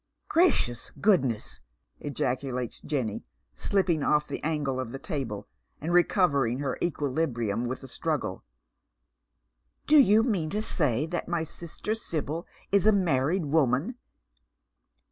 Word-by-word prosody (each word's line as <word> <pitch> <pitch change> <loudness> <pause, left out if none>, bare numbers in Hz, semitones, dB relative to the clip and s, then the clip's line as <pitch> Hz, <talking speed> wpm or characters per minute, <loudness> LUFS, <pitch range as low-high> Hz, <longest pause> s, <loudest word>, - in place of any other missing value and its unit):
"Gracious 290 - +2
goodness!" 135 - +1 0.4
ejaculates 125 -2 -3
Jenny, 125 -9 -2 0.3
slipping 185 -6 +1
off 150 +1 +2
the - - -5
angle 145 -4 -1
of 130 -3 -4
the 135 - -5
table, 130 - -4 0.3
and 165 +4 -2
recovering 150 - +3
her 135 -2 -3
equilibrium 130 -8 -1
with 130 +2 -5
a - - -8
struggle, - - -3 1.4
"do 305 - +6
you 220 -4 +6
mean 195 -10 0
that 160 - -1
my 170 -2 0
sister 170 +6 -4
Sibyl 165 -6 -3 0.2
is 200 +1 +4
a - - +8
manied 170 -3 +1
woman 145 - +2
150 Hz, 115 wpm, -28 LUFS, 130-180 Hz, 1.4 s, a